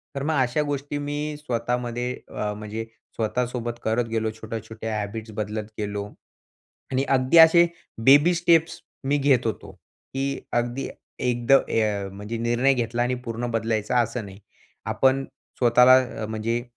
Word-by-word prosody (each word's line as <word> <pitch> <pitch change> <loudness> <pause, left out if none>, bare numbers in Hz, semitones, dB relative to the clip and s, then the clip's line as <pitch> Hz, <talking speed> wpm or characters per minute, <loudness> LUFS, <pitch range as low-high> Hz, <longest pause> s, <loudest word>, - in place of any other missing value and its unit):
तर 140 - -3
मग 155 +1 0
अशा 125 +4 +1
गोष्टी 145 0 -3
मी 145 0 -3 0.2
स्वतःमध्ये 120 -2 -2 0.2
अ, 105 0 -3
म्हणजे 105 +2 -6 0.3
स्वतःसोबत 120 +1 -2
करत 115 +2 +1
गेलो. 110 -1 0
छोट्या-छोट्या 110 0 -6
हॅबिट्स 110 +2 -5
बदलत 105 0 -3
गेलो 105 -1 -3 0.9
आणि 130 +1 +1
अगदी 130 +5 +4
असे 165 +1 +8 0.4
बेबी 145 +6 +7
स्टेप्स 165 -1 +2 0.2
मी 145 +2 +2
घेत 135 -4 +3
होतो. 110 - -4 0.4
की 135 +1 -2
अगदी 120 +2 -1 0.3
एकद 120 0 0 0.2
ए 105 -3 0
म्हणजे 105 +4 -6
निर्णय 120 +4 +2
घेतला 120 0 -1
आणि 125 +1 0
पूर्ण 115 +1 -3
बदलायचा 115 +1 0
असं 115 -1 -2
नाही. 95 -1 -11 0.5
आपण 135 0 +2 0.3
स्वतःला 125 -1 +4
म्हणजे 110 +2 -2
120 Hz, 135 wpm, -24 LUFS, 110-135 Hz, 0.9 s, असे